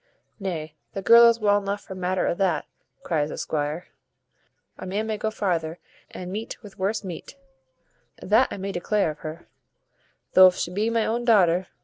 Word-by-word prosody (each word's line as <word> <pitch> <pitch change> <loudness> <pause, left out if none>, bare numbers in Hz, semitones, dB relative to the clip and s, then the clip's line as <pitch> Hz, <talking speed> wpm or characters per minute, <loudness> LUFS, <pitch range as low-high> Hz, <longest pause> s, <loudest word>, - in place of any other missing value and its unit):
"Nay, 165 -6 -4 0.2
the 195 - -5
girl 235 +2 +8
is 230 0 +1
well 205 -1 +3
enough 200 +1 -3
for 190 - -9
matter 185 0 -1
o' - - +1
that," 175 -4 0 0.4
cries 150 -3 0
the - - -6
squire; 150 +2 -3 0.9
"a - - -8
man 205 +4 -2
may 220 -1 -2
go 215 +1 -2
farther 175 -6 -2 0.3
and 180 0 -7
meet 215 +3 -5
with 200 -3 -13
worse 205 +3 -1
meat; 185 +8 -8 0.8
that 220 +6 +3
I - - -6
may 195 +1 -4
declare 195 -1 0
o'her, 155 +2 -9 0.9
thof 185 -1 +8
she 175 - -3
be 210 +4 0
my 230 -1 +1
own 235 +2 -1
daughter. 185 -6 +4
190 Hz, 170 wpm, -25 LUFS, 175-215 Hz, 0.9 s, girl